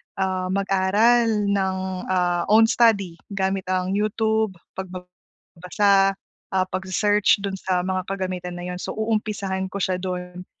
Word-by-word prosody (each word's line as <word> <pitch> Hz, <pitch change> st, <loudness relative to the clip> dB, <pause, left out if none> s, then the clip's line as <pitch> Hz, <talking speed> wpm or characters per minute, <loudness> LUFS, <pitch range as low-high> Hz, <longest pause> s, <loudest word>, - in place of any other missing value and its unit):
ah, 185 Hz, -1 st, -1 dB
mag-aral 205 Hz, +3 st, +2 dB
ng, 190 Hz, -1 st, 0 dB, 0.3 s
ah, 175 Hz, -2 st, +1 dB
own 225 Hz, +1 st, +5 dB
study 200 Hz, -8 st, +2 dB, 0.2 s
gamit 190 Hz, -1 st, -1 dB
ang 185 Hz, 0 st, 0 dB
YouTube, 220 Hz, 0 st, 0 dB, 0.3 s
pagbabasa, 190 Hz, +2 st, -1 dB, 0.4 s
ah, 185 Hz, -, +3 dB
pagse-search 200 Hz, +3 st, +2 dB
dun 195 Hz, -1 st, -3 dB
sa 185 Hz, -1 st, 0 dB
mga 185 Hz, 0 st, -2 dB
kagamitan 185 Hz, -2 st, -4 dB
na 175 Hz, -, -7 dB
yun, 180 Hz, 0 st, -5 dB
so, -, -, -4 dB
uumpisahan 210 Hz, -3 st, -2 dB
ko 190 Hz, -, -13 dB
siya 185 Hz, 0 st, 0 dB
dun. 180 Hz, -1 st, -5 dB
190 Hz, 130 wpm, -23 LUFS, 185-205 Hz, 0.4 s, own